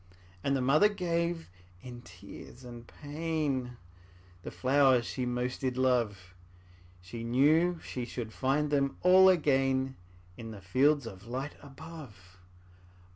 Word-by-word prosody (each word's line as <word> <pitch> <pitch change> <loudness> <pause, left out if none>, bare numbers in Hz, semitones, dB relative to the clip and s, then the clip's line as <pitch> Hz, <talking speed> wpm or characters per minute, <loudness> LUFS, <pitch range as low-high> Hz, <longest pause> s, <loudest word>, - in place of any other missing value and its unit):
'' 90 0 -26
And 140 - +1
the 135 - 0
mother 155 +11 +4
gave, 170 - -2 0.3
in 120 -1 -9
tears 95 +7 -13
and 120 -1 -11
pain, 145 -5 -3 0.6
The - - -7
flowers 130 -2 +3
she 125 +1 -3
most 125 +1 -3
did 130 -2 -2
love; 115 -8 0 0.7
She 105 +6 -8
knew 155 +9 +3
she 125 -2 -5
should 115 -3 -6
find 145 +3 0
them 140 -1 0
all 185 +1 +7
again 135 -5 +1 0.4
In 115 -1 -8
the 105 -2 -9
fields 135 +9 +2
of 100 -1 -10
light 130 +4 -4
above. 135 - -12
130 Hz, 130 wpm, -30 LUFS, 120-150 Hz, 0.7 s, all